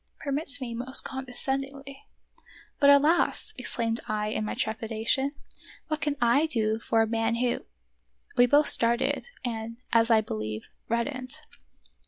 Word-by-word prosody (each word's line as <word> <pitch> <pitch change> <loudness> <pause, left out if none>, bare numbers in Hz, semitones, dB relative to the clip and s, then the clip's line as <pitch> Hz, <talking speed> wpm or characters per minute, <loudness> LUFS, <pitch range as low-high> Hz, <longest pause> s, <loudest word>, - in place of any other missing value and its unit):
Permit 285 +2 -3
me 245 -3 -5
most 255 +3 +1
condescendingly" 270 +1 -5 0.2
— - - -27
" - - -28
But, 280 - +6
alas! 290 +4 +3
" - - -31
exclaimed 230 -1 -2
I 210 0 -1
in 215 - -2
my 215 - -3
trepidation, 225 +5 -1 0.6
"what 310 -1 -2
can 295 -1 0
I 245 +6 +3
do 220 -6 0
for 225 0 +2
a - - -1
man 225 +1 0
who" 245 +1 -1 0.3
— - - -32
We 245 - +6
both 290 +4 +4
started, 235 - +2 0.2
and, 230 -1 -4 0.2
as 230 0 +4
I 225 -2 +5
believe, 110 - -5 0.2
reddened. 255 +2 -2
235 Hz, 155 wpm, -27 LUFS, 225-275 Hz, 0.6 s, But